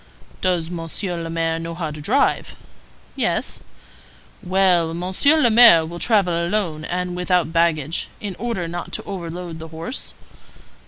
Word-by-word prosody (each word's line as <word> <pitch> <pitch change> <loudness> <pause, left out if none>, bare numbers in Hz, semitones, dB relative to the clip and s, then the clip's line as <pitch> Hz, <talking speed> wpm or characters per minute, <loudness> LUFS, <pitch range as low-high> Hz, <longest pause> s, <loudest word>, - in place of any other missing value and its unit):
"Does 175 -3 0
Monsieur 170 +1 -4
le 165 - -5
Maire 165 0 -1
know 165 0 -5
how 165 -3 -4
to 150 0 -8
drive?" - - +1 0.6
"Yes." - - -1 0.8
"Well, 180 -3 +2
Monsieur 190 - +3
le 240 -6 +4
Maire 220 -8 +8
will 170 +2 -7
travel 200 -6 +2
alone 170 -2 -1
and 180 0 -3
without 180 -2 0
baggage, 165 -2 +1
in 200 -3 -5
order 225 -7 -2
not 175 +1 -6
to - - -3
overload 175 -2 -6
the 160 - -8
horse?" 165 - -6
175 Hz, 145 wpm, -21 LUFS, 165-185 Hz, 0.8 s, Maire